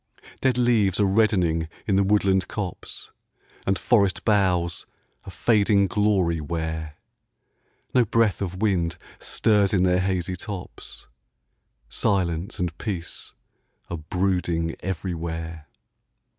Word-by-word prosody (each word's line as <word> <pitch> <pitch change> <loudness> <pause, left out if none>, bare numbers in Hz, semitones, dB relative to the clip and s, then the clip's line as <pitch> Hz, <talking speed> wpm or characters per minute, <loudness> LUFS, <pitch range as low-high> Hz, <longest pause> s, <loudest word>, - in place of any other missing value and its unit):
Dead 130 -2 +2
leaves 110 -6 +2
are 105 - +4
reddening 95 -6 +2 0.2
in 100 - +1
the 100 - +4
woodland 95 -2 +2
copse, 100 -5 -6 0.6
And 95 0 +2
forest 100 -6 +2
boughs 90 -6 +1 0.4
a - - -8
fading 105 -3 +3
glory 95 -5 +1
wear; 80 -1 -4 1.0
No 125 - +5
breath 115 -2 +1
of 95 +1 -3
wind 85 -5 +1 0.2
stirs 105 -2 +2
in 90 - +3
their 90 0 +3
hazy 95 -1 -1
tops, 95 +1 -8 0.8
Silence 90 - -1
and 85 -2 -2
peace 90 -6 -5 0.6
are 85 - -2
brooding 85 -1 -1
everywhere. 80 -3 -4
95 Hz, 110 wpm, -24 LUFS, 85-100 Hz, 1.0 s, No